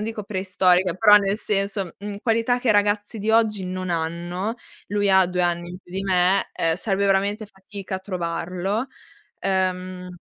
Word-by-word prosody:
non - - -2
dico 220 -1 -4
preistorica, 185 -2 +2
però 210 +2 +7
nel 200 0 +2
senso 195 -3 -1
mhmm, 205 0 -6
qualità 230 +1 +2
che 250 - -2
i - - +6
ragazzi 205 +1 +1
di 215 +2 -1
oggi 215 -4 +2
non 185 0 -4
hanno, 175 +5 -2 0.3
lui 205 -1 +1
ha 190 -1 +5
2 180 0 -1
anni 175 0 -1
in 180 - -8
più 175 - -17
di 190 +1 -2
me, 185 0 +2
ehm, 165 0 +1
sarebbe 200 +1 0
veramente 200 +2 +1
fatica 195 -1 -7
a - - -6
trovarlo. 185 +4 -3 0.5
Ehm, 185 -1 -2
195 Hz, 175 wpm, -23 LUFS, 180-205 Hz, 0.5 s, però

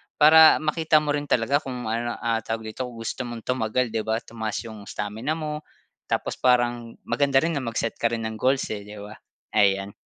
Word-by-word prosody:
para 160 +1 +7
makita 155 0 +2
mo 150 - -4
rin 145 0 -1
talaga 135 +1 +2
kung 125 -5 -5
ano 120 +1 -1
ah 115 -1 0
tawag 110 -1 -4
dito, 130 - -4
kung 120 - -11
gusto 115 - -4
mong 120 -1 -7
tumagal, 125 0 0
'di 110 - 0
ba? 110 0 0
Tumaas 110 -2 -4
'yong 110 -3 -10
stamina 105 +9 -3
mo, 155 -1 -5 0.4
tapos - - -2
parang 120 -2 +1
maganda 135 +2 +2
rin 165 -2 0
na 135 - -3
mag-set 115 0 -2
ka 115 0 0
rin 115 -1 -2
ng 110 - -7
goals, 130 +3 +2
eh, 105 -1 -5
'di 105 0 -10
ba? 105 +1 -10 0.4
Ayan. 100 -1 +2
120 Hz, 205 wpm, -24 LUFS, 110-140 Hz, 0.4 s, para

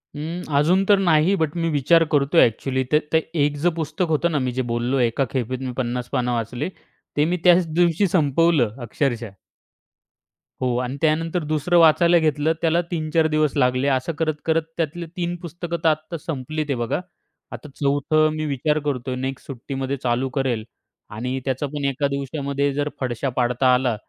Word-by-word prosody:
हं. 165 +4 -5
अजून 175 +7 +3
तर 205 - +7
नाही. 170 +1 +3
बट, 155 +1 0
मी 165 -1 0
विचार 160 +3 +4
करतोय. 145 +3 +4
ॲक्चुअली 130 +3 0
ते 150 - +5
ते 160 - +6 0.3
एकच 145 +2 -3
पुस्तक 170 +3 -2
होतं 170 +3 0
ना, 150 - +1
मी 130 -1 -1
जे 130 +1 -2
बोललो, 120 +3 0
एका 120 +3 +1
खेपेत 130 -1 -2
मी 130 - -3
50 125 -1 -2
पानं 125 0 0
वाचली, 120 +5 -3 0.5
ते 150 - +4
मी 180 +3 0
त्याच 180 0 +6
दिवशी 175 +3 +3
संपवलं, 155 - +2
अक्षरशः. 120 -1 -2 1.3
हो. 125 -1 0
आणि 125 +2 -3
त्यानंतर 165 +2 +1
दुसरं 155 +3 +1
वाचायला 170 +2 +5
घेतलं, 155 0 +1
त्याला 170 +1 +2
3-4 160 -1 +1
दिवस 155 -2 +1
लागले. 130 +1 +2
असं 130 +4 0
करत-करत 160 0 0 0.2
त्यातले 170 +1 -2
3 175 0 -2
पुस्तकं 170 0 -5
तर 165 - +5
आता 155 +2 -2
संपली, 155 0 -4
ते 140 - +1
बघा. 120 +6 -1 0.5
आता 150 - -9
चौथं 150 +2 +2
मी 155 - -2
विचार 150 +2 0
करतोय, 130 -2 -2
नेक्स्ट 130 +1 -5
सुट्टीमध्ये 135 +1 -4
चालू 125 +2 0
करेल. 125 -5 0 0.5
आणि 125 +5 -3
त्याचा 130 +1 -1
पण 145 0 -4
एका 140 +1 -1
दिवसामध्ये 140 0 -2
जर 145 +1 -1
फडशा 130 +1 -2
पाडता 125 +1 +3
आला, 125 -2 +1
145 Hz, 170 wpm, -22 LUFS, 130-160 Hz, 1.3 s, तर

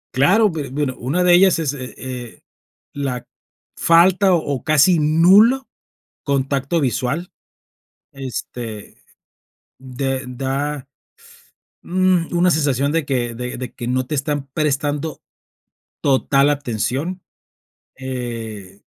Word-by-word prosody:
Claro, 195 - +4
be 150 -5 -5
bueno, 135 -1 -2
una 150 +9 0
de 180 - +5
ellas 185 +1 +5
es, 150 -4 -1
eh, 125 -2 -8 0.5
la 135 -4 -4 0.5
falta 185 +3 +4
o 145 -5 -2
casi 155 +3 +4
nulo 195 - +5 0.6
contacto 140 +3 0
visual, 135 +7 -1 0.8
este, 120 -5 -7 0.8
de 135 0 -3
da, 135 +2 -3 1.0
mm, 185 -2 +1
una 180 +1 +4
sensación 140 -2 +1
de 165 -1 +1
que, 120 -4 -2
de 125 0 -5
de 125 -2 -6
que 120 - -7
no 130 +1 0
te 150 - -3
están 140 0 -2
prestando 150 +1 -1 0.8
total 140 +1 +3
atención, 145 - -2 0.7
eh, 115 -7 -6
140 Hz, 105 wpm, -20 LUFS, 130-165 Hz, 1.0 s, de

